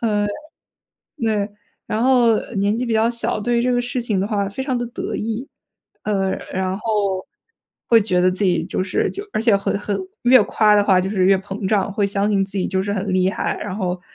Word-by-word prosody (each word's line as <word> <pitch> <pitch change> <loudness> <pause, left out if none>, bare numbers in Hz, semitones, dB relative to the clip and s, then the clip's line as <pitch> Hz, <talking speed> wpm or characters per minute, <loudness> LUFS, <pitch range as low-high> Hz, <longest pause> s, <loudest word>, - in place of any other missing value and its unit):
嗯。 210 -3 +1
呃， - - -2 0.9
对 215 -3 0 0.4
然 215 +2 -1
后 245 -3 +5
呃， 220 +2 -3
年 200 +2 +1
纪 250 - -1
比 230 - -1
较 220 +1 +3
小， 230 -2 -2
对 235 +2 +1
这 250 0 +1
个 245 - +2
事 245 +1 -3
情 215 -5 -1
的 195 - 0
话 200 -3 0
非 265 +7 -5
常 265 -2 -1
地 240 - -3
得 240 - -5
意。 225 +5 -4 0.6
呃， 195 -2 0 0.2
然 185 0 -1
后， 205 -4 -1 0.6
会 230 -1 +6
觉 180 -4 +1
得 185 0 +4
自 190 +3 -2
己 175 -3 +2
就 185 - -2
是 185 - 0
就 400 +1 -6
而 - - 0
且 225 -4 +4
很 200 0 -1
很 205 -1 -2 0.2
越 245 -2 +6
夸 210 0 +3
的 205 - +5
话 190 -3 +4
就 190 - -2
是 190 -3 +1
越 195 0 +5
膨 195 +1 -5
胀， 205 -1 +1
会 205 -1 +1
相 200 +1 0
信 195 -1 +2
自 195 0 -6
己 - - 0
就 190 0 0
是 200 +1 -2
很 195 -1 -2
厉 185 0 +2
害， - - -2
然 200 -3 -4
后， 180 -3 -2
205 Hz, 250 characters per minute, -20 LUFS, 195-230 Hz, 0.9 s, 会